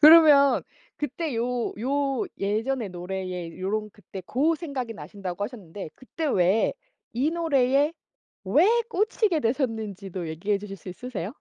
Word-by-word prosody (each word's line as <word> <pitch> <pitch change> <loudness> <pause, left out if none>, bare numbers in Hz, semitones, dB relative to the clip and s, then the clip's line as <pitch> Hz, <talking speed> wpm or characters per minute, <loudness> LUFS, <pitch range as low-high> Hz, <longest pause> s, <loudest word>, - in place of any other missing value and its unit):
그러면 300 -3 +8 0.3
그때 295 +1 -3
요 240 +1 -1
요 275 - 0
예전의 220 +4 0
노래에 180 -1 -5
요런 210 +3 -2
그때 195 -2 -9
고 295 - +2
생각이 280 -8 -4
나신다고 200 -2 -5
하셨는데 200 -7 -7
그때 310 +5 -5
왜 190 -4 +3 0.4
이 265 +6 +2
노래에 290 -3 +3 0.5
왜 280 - +5 0.2
꽂히게 420 -4 +2
되셨는지도 215 - -2
얘기해 195 +6 0
주실 195 -1 -7
수 190 - -11
있으세요? 210 -1 -5
235 Hz, 290 characters per minute, -26 LUFS, 195-285 Hz, 0.5 s, 그러면